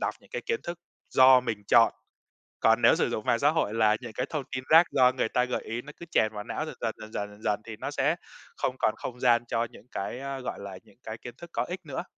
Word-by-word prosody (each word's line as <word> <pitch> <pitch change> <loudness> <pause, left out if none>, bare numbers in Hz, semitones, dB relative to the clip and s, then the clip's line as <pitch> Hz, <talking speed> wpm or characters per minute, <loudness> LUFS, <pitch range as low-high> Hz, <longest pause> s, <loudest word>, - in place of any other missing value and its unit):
đọc - - -1
những - - -22
cái - - -4
kiến 460 - 0
thức 170 0 -6 0.3
do 130 -1 +7
mình 110 -4 -4
chọn, 115 +2 +6 0.7
còn - - +4
nếu - - +7
sử - - +1
dụng 110 - -3
mạng 115 - +3
xã 145 +3 +4
hội 155 -9 0
là 110 -1 +4
những 120 -3 -8
cái 125 +4 -2
thông 150 -4 -2
tin 130 0 -3
rác 165 +2 +7
do 125 0 +5
người 125 -3 -1
ta 125 - +1
gợi 125 - -3
ý, 115 +2 -5
nó 150 +2 -11
cứ 170 - -10
chèn 110 0 +2
vào 105 -1 -6
não - - -3
dần - - -7
dần, - - -1
dần 110 0 -10
dần, 105 0 -3
dần 105 +1 -16
dần 105 -1 0
thì 110 -2 -8
nó 135 - -4
sẽ 145 +3 +1 0.4
không 130 0 -1
còn 110 - +2
không 125 0 -7
gian 120 -2 +4
cho 115 0 0
những - - -16
cái, 120 +6 -4
a, 135 -1 -5
gọi 125 - -5
là, 100 -2 -8
những - - -23
cái 110 0 -7
kiến 120 -1 -9
thức 170 0 -11
có - - 0
ích 180 +2 -6
nữa. 135 -3 -4
125 Hz, 280 wpm, -28 LUFS, 110-135 Hz, 0.7 s, do